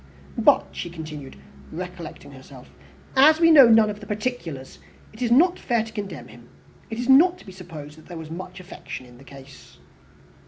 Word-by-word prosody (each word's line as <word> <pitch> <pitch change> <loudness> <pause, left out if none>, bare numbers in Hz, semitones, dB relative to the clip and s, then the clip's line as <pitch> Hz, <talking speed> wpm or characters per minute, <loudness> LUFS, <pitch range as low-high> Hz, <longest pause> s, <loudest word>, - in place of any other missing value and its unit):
But," - - +4
she - - -6
continued, 155 -5 -9 0.4
recollecting 175 -3 -8
herself, 130 -1 -14 0.4
"as 305 +4 +6
we 330 -1 +5
know 275 -6 +8
none 225 -1 +6
of 210 0 -5
the 210 - -12
particulars, 210 - -5 0.3
it 215 - -14
is 240 - 0
not 345 +9 +4
fair 235 -3 0
to 220 0 -11
condemn 195 -8 -7
him. 120 0 -16 0.4
It 225 - -6
is 245 +1 -3
not 335 +7 +5
to - - -17
be 190 - -11
supposed 160 -5 -11
that - - -18
there 175 - -9
was 160 -1 -9
much 180 +2 -8
affection 180 -7 -9
in 120 0 -17
the - - -15
case." 135 0 -15
185 Hz, 190 wpm, -23 LUFS, 150-235 Hz, 0.4 s, know